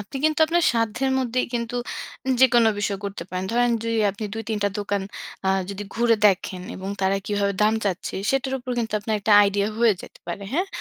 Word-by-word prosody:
আপনি 210 Hz, +6 st, -7 dB
কিন্তু 310 Hz, 0 st, +2 dB
আপনার 345 Hz, +1 st, +2 dB
সাধ্যের 230 Hz, +4 st, 0 dB
মধ্যেই 255 Hz, 0 st, 0 dB
কিন্তু 235 Hz, 0 st, -2 dB, 0.6 s
যেকোন 245 Hz, -3 st, +6 dB
বিষয় 200 Hz, -1 st, -1 dB
করতে 200 Hz, -3 st, -4 dB
পারেন। 185 Hz, 0 st, -3 dB
ধরেন 245 Hz, 0 st, +3 dB
যদি 230 Hz, 0 st, -1 dB
আপনি 205 Hz, +2 st, -7 dB
২ 225 Hz, -, -4 dB
৩ 215 Hz, -2 st, -1 dB
টা 205 Hz, -, +4 dB
দোকান 200 Hz, -1 st, -1 dB, 0.4 s
আ -, -, +3 dB, 0.2 s
যদি 200 Hz, +1 st, -5 dB
ঘুরে 230 Hz, -1 st, +3 dB
দেখেন 185 Hz, -2 st, 0 dB
এবং 190 Hz, +1 st, -6 dB
তারা 190 Hz, +1 st, +2 dB
কিভাবে 205 Hz, -1 st, 0 dB
দাম 215 Hz, +1 st, +4 dB
চাচ্ছে 185 Hz, -3 st, -2 dB, 0.2 s
সেটার 270 Hz, 0 st, 0 dB
উপর 250 Hz, 0 st, -7 dB
কিন্তু 225 Hz, -2 st, -2 dB
আপনার 215 Hz, +1 st, -2 dB
একটা 210 Hz, +1 st, +2 dB
আইডিয়া 200 Hz, +1 st, +1 dB
হয়ে 235 Hz, -2 st, +5 dB
যেতে -, -, -13 dB
পারে। 175 Hz, +4 st, -4 dB
হ্যাঁ? 355 Hz, +7 st, +1 dB
220 Hz, 200 wpm, -24 LUFS, 200-240 Hz, 0.6 s, যেকোন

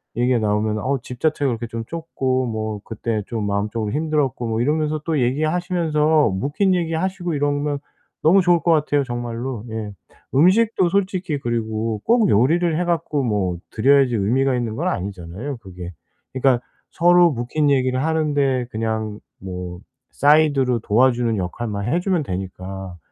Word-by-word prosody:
얘기가 120 Hz, 0 st, +2 dB
나오면은 105 Hz, 0 st, 0 dB
"어 140 Hz, +2 st, 0 dB
집 125 Hz, -1 st, -9 dB
자체가 155 Hz, -3 st, +1 dB
그렇게 120 Hz, 0 st, -3 dB
좀 115 Hz, 0 st, -5 dB
좁고 130 Hz, -6 st, -2 dB
뭐 110 Hz, -2 st, -3 dB
그때 110 Hz, -1 st, -3 dB
좀 115 Hz, -4 st, -3 dB
마음적으로 105 Hz, +2 st, -2 dB
힘들었고" 150 Hz, -4 st, -1 dB
뭐 110 Hz, +1 st, 0 dB
이러면서 155 Hz, +3 st, 0 dB
또 160 Hz, -3 st, 0 dB
얘기하시면서 155 Hz, +1 st, +1 dB
묵힌 145 Hz, -, 0 dB
얘기하시고 175 Hz, +1 st, -2 dB
이러면 145 Hz, 0 st, 0 dB, 0.5 s
너무 185 Hz, +5 st, +6 dB
좋을 175 Hz, -2 st, +3 dB
것 170 Hz, -, +2 dB
같아요, 145 Hz, -2 st, +2 dB
정말로. 120 Hz, -1 st, -4 dB
예. 110 Hz, -2 st, -4 dB, 0.4 s
음식도 185 Hz, +5 st, +4 dB
솔직히 185 Hz, -5 st, -1 dB
그리고 110 Hz, -3 st, -2 dB
꼭 230 Hz, -2 st, +4 dB
요리를 160 Hz, +9 st, +3 dB
해 -, -, +1 dB
갖고 165 Hz, -4 st, 0 dB
뭐 100 Hz, -6 st, 0 dB
드려야지 135 Hz, +1 st, +3 dB
의미가 125 Hz, +6 st, +1 dB
있는 120 Hz, -3 st, -2 dB
건 170 Hz, +8 st, -2 dB
아니잖아요, 100 Hz, -, -4 dB
그게. 90 Hz, -5 st, -9 dB, 0.4 s
그러니까 130 Hz, -2 st, +2 dB, 0.3 s
서로 175 Hz, 0 st, +5 dB
묵힌 140 Hz, +5 st, 0 dB
얘기를 130 Hz, -1 st, +1 dB
하는데 145 Hz, -5 st, +1 dB
그냥 110 Hz, -1 st, -3 dB, 0.2 s
뭐 90 Hz, -1 st, -6 dB, 0.3 s
사이드로 140 Hz, -4 st, +3 dB
도와주는 120 Hz, 0 st, +2 dB
역할만 100 Hz, +3 st, -3 dB
해 170 Hz, -, +2 dB
주면 180 Hz, -2 st, 0 dB
되니까. 95 Hz, -1 st, -6 dB
130 Hz, 345 characters per minute, -21 LUFS, 110-155 Hz, 0.5 s, 너무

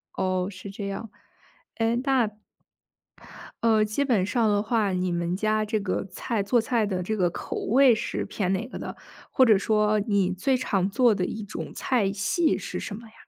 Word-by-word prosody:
哦， 185 Hz, 0 st, 0 dB
是 195 Hz, 0 st, -9 dB
这 200 Hz, 0 st, -5 dB
样。 200 Hz, +3 st, -5 dB, 0.7 s
诶， 225 Hz, 0 st, +1 dB
那 265 Hz, -4 st, +2 dB, 1.4 s
呃， 220 Hz, -2 st, +4 dB
基 215 Hz, +7 st, -1 dB
本 230 Hz, -8 st, +2 dB
上 225 Hz, +3 st, +1 dB
的 205 Hz, 0 st, +2 dB
话， 215 Hz, -2 st, +1 dB
你 180 Hz, 0 st, -1 dB
们 170 Hz, +1 st, -1 dB
家 215 Hz, +1 st, +1 dB
这 215 Hz, 0 st, -1 dB
个 200 Hz, -2 st, -2 dB
菜 215 Hz, +2 st, -2 dB
做 235 Hz, +4 st, +2 dB
菜 225 Hz, -1 st, +1 dB
的 185 Hz, -3 st, -2 dB
这 215 Hz, +4 st, -2 dB
个 180 Hz, -3 st, +3 dB
口 -, -, -6 dB
味 255 Hz, +1 st, +4 dB
是 -, -, -3 dB
偏 195 Hz, -2 st, -1 dB
哪 220 Hz, +5 st, -2 dB
个 -, -, -8 dB
的， -, -, -6 dB, 0.4 s
或 260 Hz, -, +5 dB
者 220 Hz, -4 st, +6 dB
说 210 Hz, +1 st, +2 dB
你 200 Hz, -3 st, +1 dB
最 260 Hz, +9 st, +1 dB
常 195 Hz, -7 st, 0 dB
做 235 Hz, +2 st, +3 dB
的 185 Hz, -2 st, -1 dB
一 220 Hz, -, -5 dB
种 205 Hz, -, -7 dB
菜 220 Hz, -7 st, 0 dB
系 200 Hz, -, +1 dB
是 -, -, -5 dB
什 205 Hz, -, -5 dB
么 230 Hz, +2 st, -11 dB
呀？ 220 Hz, -, -20 dB
215 Hz, 210 characters per minute, -26 LUFS, 195-230 Hz, 1.4 s, 者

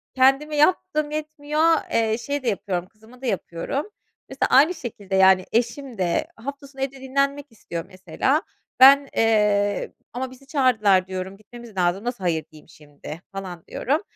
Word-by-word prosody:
kendime 270 Hz, +4 st, +3 dB
yaptığım 305 Hz, -1 st, +2 dB
yetmiyor, 305 Hz, 0 st, -3 dB, 0.3 s
eee, 225 Hz, -1 st, +1 dB
şeye 280 Hz, +3 st, -4 dB
de 235 Hz, -, +1 dB
yapıyorum 185 Hz, -3 st, -2 dB
kızıma 220 Hz, +5 st, -19 dB
da -, -, -6 dB
yapıyorum. 220 Hz, -, -3 dB, 0.4 s
Mesela 265 Hz, -, -1 dB
aynı 295 Hz, +7 st, +6 dB
şekilde, 205 Hz, -, -6 dB
yani, 190 Hz, -1 st, +5 dB
eşim 240 Hz, +1 st, -1 dB
de 175 Hz, -2 st, 0 dB
hafta 280 Hz, +4 st, -7 dB
sonu 270 Hz, -1 st, -11 dB
evde 270 Hz, 0 st, -3 dB
dinlenmek 275 Hz, +2 st, 0 dB
istiyor 170 Hz, -6 st, -7 dB
mesela. 195 Hz, -, -1 dB, 0.4 s
Ben, 275 Hz, +1 st, +8 dB
eee, 210 Hz, -2 st, +2 dB, 0.2 s
"Ama 255 Hz, +1 st, -4 dB
bizi 270 Hz, +1 st, -16 dB
çağırdılar." 215 Hz, -10 st, +3 dB
diyorum, 190 Hz, +1 st, -5 dB
"Gitmemiz 225 Hz, -1 st, -13 dB
lazım 180 Hz, +3 st, +1 dB
nasıl 240 Hz, -5 st, -4 dB
hayır 160 Hz, -3 st, 0 dB
diyeyim 155 Hz, +1 st, -17 dB
şimdi?" 150 Hz, +2 st, -11 dB
falan 185 Hz, -4 st, -7 dB
diyorum. 295 Hz, +7 st, -1 dB
235 Hz, 155 wpm, -23 LUFS, 190-275 Hz, 0.4 s, Ben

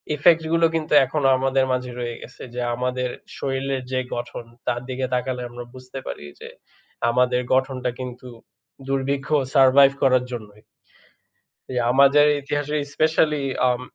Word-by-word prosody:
Effect 165 Hz, +2 st, +4 dB
গুলো 165 Hz, 0 st, +4 dB
কিন্তু 155 Hz, -2 st, -2 dB
এখনো 135 Hz, +1 st, 0 dB
আমাদের 135 Hz, 0 st, +1 dB
মাঝে 125 Hz, 0 st, -2 dB
রয়ে 120 Hz, -1 st, -4 dB
গেছে। 125 Hz, -, -11 dB
যে 125 Hz, -, -2 dB
আমাদের 125 Hz, +1 st, -2 dB, 0.3 s
শরীলের 135 Hz, 0 st, -2 dB
যে 130 Hz, -, +1 dB, 0.2 s
গঠন 120 Hz, 0 st, -6 dB, 0.2 s
তার 120 Hz, -, 0 dB
দিকে 130 Hz, 0 st, -2 dB
তাকালে 125 Hz, 0 st, -1 dB
আমরা 120 Hz, 0 st, -8 dB
বুঝতে 130 Hz, +1 st, -9 dB
পারি -, -, -6 dB
যে, -, -, -9 dB, 0.6 s
আমাদের 125 Hz, +1 st, +2 dB
গঠনটা 130 Hz, -1 st, 0 dB
কিন্তু 125 Hz, 0 st, -7 dB, 0.6 s
দুর্ভিক্ষ 135 Hz, 0 st, -1 dB, 0.3 s
সারভাইভ 135 Hz, 0 st, +6 dB
করার 130 Hz, -2 st, +4 dB
জন্যই। 105 Hz, -3 st, -8 dB, 1.3 s
আমাদের 140 Hz, +2 st, +6 dB
ইতিহাসে 145 Hz, +1 st, -2 dB, 0.2 s
স্পেশালি 155 Hz, -2 st, +2 dB, 0.3 s
আম 125 Hz, 0 st, 0 dB
130 Hz, 135 wpm, -23 LUFS, 125-140 Hz, 1.3 s, সারভাইভ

